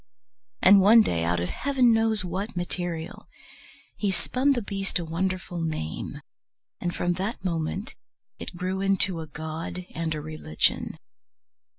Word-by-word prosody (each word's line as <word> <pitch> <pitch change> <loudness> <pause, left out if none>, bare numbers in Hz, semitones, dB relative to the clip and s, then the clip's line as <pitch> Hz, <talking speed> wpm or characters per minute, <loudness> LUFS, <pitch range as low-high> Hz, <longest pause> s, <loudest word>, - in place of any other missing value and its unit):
And 195 +1 +8
one 220 +4 +8
day, 85 - 0
out 85 +1 +1
of 90 +1 -2
Heaven 260 -4 +3
knows 225 -3 +4
what 190 +5 -4
material, 175 0 -4 0.7
he 205 - -1
spun 255 +8 +1
the 240 - -1
beast 195 -1 -2
a 175 - -3
wonderful 175 +1 -2
name, 155 - -4 0.6
and 175 - -1
from 175 0 +1
that 190 +2 -4
moment 170 +4 -2 0.5
it - - -7
grew 185 +2 -2
into 195 -2 +2
a 160 - -7
god 160 +4 -5
and 160 -1 -2
a - - -3
religion. 155 +1 -1
180 Hz, 145 wpm, -26 LUFS, 160-200 Hz, 0.7 s, And